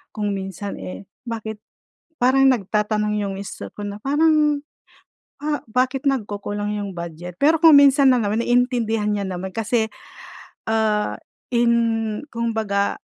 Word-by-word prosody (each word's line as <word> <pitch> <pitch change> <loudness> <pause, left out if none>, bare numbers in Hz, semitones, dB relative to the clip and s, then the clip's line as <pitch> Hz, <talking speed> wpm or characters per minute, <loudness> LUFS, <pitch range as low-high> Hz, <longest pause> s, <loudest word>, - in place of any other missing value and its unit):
kung 205 -1 -1
minsan, 195 0 -5
eh, 95 +1 -7 0.2
bakit 220 -2 -5 0.6
parang 265 +2 +4
nagtatanong 210 -2 0
yung 195 -1 -3
mister 195 -1 -7
ko 205 - -6
na 205 0 -6
parang, 295 +1 +2 0.8
ah 295 -2 -1
bakit 260 +4 +1
nagkukulang 205 -3 -3
yung 200 -3 -5
budget? 170 +1 -7
Pero 315 +3 +3
kung 320 -3 +9
minsan 280 -1 +6
lang 245 -4 +3
naman 215 +3 0
naintindihan 235 -3 +1
niya 200 -2 -2
naman 185 +1 -5
kasi, 225 0 -1 0.8
ah, 215 -1 0 0.3
in 230 -1 +1
kumbaga 220 -4 -1
220 Hz, 130 wpm, -22 LUFS, 205-255 Hz, 0.8 s, kung